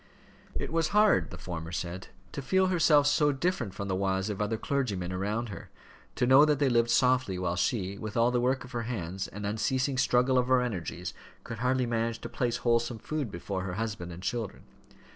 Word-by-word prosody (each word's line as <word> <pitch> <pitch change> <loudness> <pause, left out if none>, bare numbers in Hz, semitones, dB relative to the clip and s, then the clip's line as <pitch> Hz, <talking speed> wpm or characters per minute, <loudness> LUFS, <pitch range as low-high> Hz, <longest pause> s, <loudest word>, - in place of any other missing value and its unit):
"It - - -4
was 165 -1 +2
hard," 210 -1 +4
the - - -8
former 80 -2 -6
said, 90 +1 -4 0.2
"to - - -5
feel 190 +7 +2
herself 155 -4 +5
so 145 0 +3
different 135 - -2
from 100 - -4
the 95 - -1
wives 95 +1 0
of 105 - -4
other 105 +2 0
clergymen 105 -11 -2
around 105 +5 -2
her 100 - -9 0.5
to - - +1
know 130 +3 +7
that 150 -1 +3
they 140 -1 +2
lived 120 -1 +3
softly, 125 -5 +2
while 90 -1 -1
she, 100 -1 -1
with 110 0 -5
all 115 +1 +4
the 125 -1 +1
work 130 +2 +1
of 125 - -12
her 120 -3 -2
hands, 95 -4 -3
and 105 +1 -7
unceasing 130 +6 0
struggle 125 +1 +3
of 125 - 0
her 130 -1 +4
energies, 90 -6 -4 0.3
could 115 - -7
hardly 125 +1 +1
manage 115 -1 -1
to 120 - -6
place 120 0 -1
wholesome 115 0 +2
food 145 +2 -3
before 95 +1 -4
her 90 -1 -4
husband 100 -4 -4
and 85 +2 -9
children. 115 -3 -3
115 Hz, 205 wpm, -29 LUFS, 95-130 Hz, 0.5 s, know